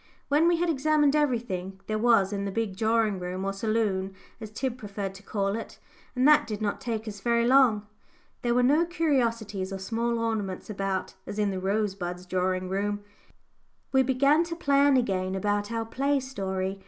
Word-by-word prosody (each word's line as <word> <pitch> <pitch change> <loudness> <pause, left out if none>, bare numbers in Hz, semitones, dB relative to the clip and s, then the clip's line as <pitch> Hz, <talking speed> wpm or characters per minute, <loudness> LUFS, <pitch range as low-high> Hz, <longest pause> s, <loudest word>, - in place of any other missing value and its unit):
When 300 +4 +4
we 345 -1 +3
had 350 +1 0
examined 300 -1 +2
everything 225 -10 -1
there 215 0 -2
was 220 -4 +3
in 200 0 -2
the 200 - -3
big 220 -2 -2
drawing 220 -1 +1
room, 180 +1 -4
or 195 - -1
saloon, 195 -2 -1 0.2
as 220 -2 -7
Tib 245 +3 -3
preferred 200 -2 -5
to 195 - -12
call 200 -1 -1
it 225 - -7 0.4
and 255 +2 +3
that 300 -5 +6
did 210 -2 -4
not 210 -2 -2
take 225 -2 -3
us 205 -1 -6
very 235 +1 +2
long; 245 -5 +4 0.6
there 240 -1 +1
were 250 - +4
no 295 +6 +4
curiosities 235 - -1
or 195 - -3
small 230 +4 -1
ornaments 220 -4 -3
about, 195 -2 -2
as 205 - -6
in 205 -1 +1
the 190 - -3
Rosebuds 190 -3 -2
drawing 185 0 -1
room 205 +2 -2 0.9
we 265 - +4
began 275 +5 +3
to 335 0 -5
plan 280 -3 +3
again 190 -6 0
about 205 +2 -1
our 230 -1 -2
play 275 +5 0
story. 195 -7 -3
215 Hz, 180 wpm, -27 LUFS, 195-255 Hz, 0.9 s, that